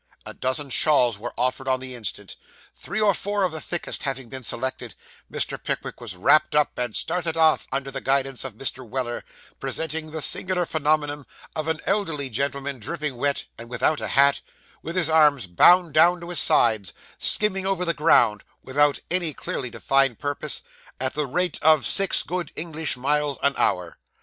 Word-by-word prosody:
A -, -, -8 dB
dozen 130 Hz, +2 st, -2 dB
shawls 125 Hz, -7 st, +3 dB
were 120 Hz, +3 st, -6 dB
offered 130 Hz, +1 st, -1 dB
on 130 Hz, -1 st, +1 dB
the 130 Hz, 0 st, -8 dB
instant. 105 Hz, -4 st, -5 dB, 0.4 s
Three -, -, -5 dB
or 210 Hz, -2 st, +4 dB
four 205 Hz, +2 st, -2 dB
of 185 Hz, -, +1 dB
the 160 Hz, -1 st, -7 dB
thickest 175 Hz, -, -4 dB
having 135 Hz, -4 st, -4 dB
been 130 Hz, +2 st, -7 dB
selected, 130 Hz, +2 st, -4 dB, 0.4 s
Mr. -, -, -3 dB
Pickwick -, -, -4 dB
was 90 Hz, -, -6 dB
wrapped 150 Hz, +12 st, +3 dB
up, 150 Hz, -1 st, +2 dB
and 120 Hz, -3 st, -3 dB
started 165 Hz, -1 st, 0 dB
off, 160 Hz, -1 st, +3 dB
under 135 Hz, 0 st, -3 dB
the 135 Hz, 0 st, -5 dB
guidance 135 Hz, -1 st, 0 dB
of 130 Hz, -5 st, -6 dB
Mr. 130 Hz, +1 st, -3 dB
Weller; 120 Hz, 0 st, -4 dB, 0.4 s
presenting 160 Hz, 0 st, -2 dB
the 155 Hz, -1 st, -3 dB
singular 180 Hz, -1 st, +3 dB
phenomenon 150 Hz, -2 st, -1 dB, 0.3 s
of 155 Hz, 0 st, -3 dB
an 160 Hz, -1 st, -2 dB
elderly 165 Hz, -10 st, -1 dB
gentleman, 140 Hz, +2 st, -2 dB
dripping 150 Hz, +4 st, -4 dB
wet, 140 Hz, +3 st, -1 dB
and 115 Hz, 0 st, -10 dB
without 145 Hz, +5 st, 0 dB
a -, -, -3 dB
hat, 140 Hz, +1 st, +3 dB, 0.4 s
with 165 Hz, +3 st, -6 dB
his 180 Hz, -4 st, +3 dB
arms 150 Hz, -6 st, +4 dB
bound 170 Hz, -, +4 dB
down 175 Hz, +3 st, +5 dB
to 170 Hz, -, -8 dB
his 175 Hz, -, +3 dB
sides, 110 Hz, -, +3 dB, 0.3 s
skimming 195 Hz, -2 st, +3 dB
over 190 Hz, -2 st, -1 dB
the 170 Hz, -, 0 dB
ground, 110 Hz, -10 st, +3 dB, 0.2 s
without 145 Hz, +2 st, +1 dB
any 175 Hz, -5 st, 0 dB
clearly 125 Hz, -, -5 dB
defined 135 Hz, 0 st, +1 dB
purpose, 145 Hz, -1 st, -2 dB, 0.4 s
at 130 Hz, +1 st, -2 dB
the 150 Hz, -1 st, -2 dB
rate 180 Hz, +7 st, 0 dB
of 155 Hz, -2 st, +4 dB
six 195 Hz, -2 st, +5 dB
good 175 Hz, -3 st, -4 dB
English 160 Hz, -4 st, -3 dB
miles 145 Hz, +2 st, 0 dB
an 140 Hz, -, +3 dB
hour. 90 Hz, -2 st, -1 dB
145 Hz, 180 wpm, -24 LUFS, 130-160 Hz, 0.4 s, down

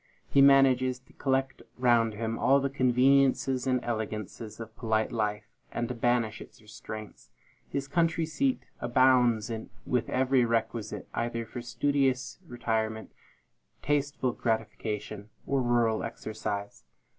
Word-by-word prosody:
He 140 Hz, -, +5 dB
manages 130 Hz, -2 st, +5 dB
to 125 Hz, 0 st, -24 dB
collect 135 Hz, -1 st, -1 dB, 0.2 s
round 120 Hz, -3 st, +3 dB
him 115 Hz, +1 st, -3 dB
all 140 Hz, +1 st, +4 dB
the 135 Hz, 0 st, -1 dB
conveniences 130 Hz, 0 st, +3 dB
and 130 Hz, -1 st, +2 dB
elegancies 110 Hz, -1 st, -4 dB
of 110 Hz, -1 st, -9 dB
polite 110 Hz, -2 st, 0 dB
life, 105 Hz, -2 st, -1 dB, 0.3 s
and 120 Hz, -, -2 dB
to -, -, -2 dB
banish 120 Hz, -2 st, 0 dB
its -, -, -13 dB
restraints. 110 Hz, -, -10 dB, 0.4 s
His 140 Hz, 0 st, -3 dB
country 165 Hz, +1 st, +1 dB
seat 260 Hz, -, 0 dB, 0.2 s
abounds 120 Hz, -3 st, +3 dB, 0.3 s
with 125 Hz, -3 st, 0 dB
every 130 Hz, 0 st, +3 dB
requisite, 115 Hz, -1 st, -2 dB
either 115 Hz, 0 st, -2 dB
for 120 Hz, +2 st, -7 dB
studious 135 Hz, +2 st, 0 dB
retirement, 110 Hz, -3 st, -2 dB, 0.7 s
tasteful 145 Hz, -3 st, 0 dB
gratification, 105 Hz, -2 st, -3 dB, 0.2 s
or 135 Hz, -1 st, +1 dB
rural 120 Hz, -2 st, +2 dB
exercise. 105 Hz, -, -5 dB
120 Hz, 120 wpm, -29 LUFS, 110-130 Hz, 0.7 s, He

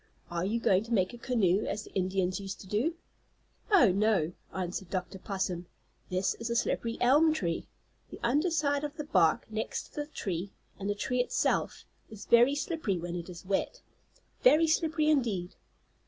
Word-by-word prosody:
"Are 170 Hz, 0 st, -1 dB
you 225 Hz, +4 st, 0 dB
going 195 Hz, -3 st, +3 dB
to 235 Hz, -, -3 dB
make 185 Hz, 0 st, +1 dB
a 240 Hz, -, -9 dB
canoe, 210 Hz, -6 st, +1 dB
as 210 Hz, +1 st, -3 dB
the -, -, -15 dB
Indians 185 Hz, 0 st, 0 dB
used 195 Hz, 0 st, -6 dB
to 190 Hz, -, -12 dB
do?" 235 Hz, -, 0 dB, 0.8 s
"Oh, 280 Hz, -, +7 dB
no," 195 Hz, -4 st, +2 dB, 0.2 s
answered 185 Hz, 0 st, -4 dB
Dr. 185 Hz, +1 st, -4 dB
Possum. 185 Hz, -3 st, -3 dB, 0.4 s
"This 185 Hz, +1 st, 0 dB
is 230 Hz, 0 st, -4 dB
a 235 Hz, -, -1 dB
slippery 230 Hz, 0 st, 0 dB
elm 295 Hz, +6 st, +5 dB
tree. 170 Hz, -, -2 dB, 0.4 s
The -, -, -10 dB
underside 290 Hz, +2 st, +1 dB
of 295 Hz, +1 st, -5 dB
the 300 Hz, -, -3 dB
bark, 165 Hz, -, +3 dB
next 220 Hz, 0 st, -3 dB
to -, -, -24 dB
the 295 Hz, -, -6 dB
tree, 195 Hz, -, -4 dB, 0.3 s
and 200 Hz, +1 st, -3 dB
the 205 Hz, -, 0 dB
tree 250 Hz, +4 st, -1 dB
itself, 245 Hz, -, 0 dB, 0.2 s
is 215 Hz, -2 st, -10 dB
very 240 Hz, +4 st, +5 dB
slippery 290 Hz, -, -1 dB
when 175 Hz, 0 st, -5 dB
it 175 Hz, 0 st, -5 dB
is 175 Hz, 0 st, -10 dB
wet. 195 Hz, +1 st, -2 dB, 0.6 s
Very 330 Hz, -9 st, +6 dB
slippery 315 Hz, -1 st, +1 dB
indeed." 225 Hz, -, +1 dB
210 Hz, 175 wpm, -30 LUFS, 185-275 Hz, 0.8 s, Oh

